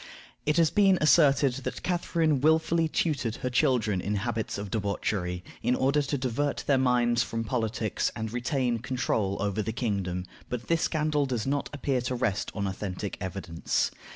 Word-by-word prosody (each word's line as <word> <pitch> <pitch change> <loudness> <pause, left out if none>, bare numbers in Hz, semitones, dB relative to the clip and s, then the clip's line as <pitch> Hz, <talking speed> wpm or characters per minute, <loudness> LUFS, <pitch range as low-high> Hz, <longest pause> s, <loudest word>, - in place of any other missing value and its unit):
It 150 +1 +2
has 165 -2 +4
been 195 -3 +5
asserted 145 -4 +5
that 135 - -5
Catharine 165 -5 +1
willfully 160 +2 +3
tutored 140 -8 -1
her 125 - -3
children 110 -6 +2
in 105 +3 -1
habits 110 +1 -2
of 100 -1 -6
debauchery, 100 -4 -2 0.2
in 125 - +2
order 140 +3 +2
to 145 0 -1
divert 130 +3 -1
their 140 -2 +3
minds 120 -2 +3
from 115 -1 -2
politics, 110 -2 -1
and 110 -1 -4
retain 125 -1 0
control 110 -5 -1
over 100 +1 0
the 105 - -2
kingdom, 100 -6 -2 0.2
but 120 -1 -5
this 165 0 +2
scandal 150 -3 +1
does 120 -4 -2
not 140 +1 -1
appear 135 -3 -1
to 125 +1 -2
rest 120 -5 -1
on 100 - -1
authentic 95 +1 -4
evidence. 90 -3 -1
125 Hz, 165 wpm, -28 LUFS, 105-145 Hz, 0.2 s, been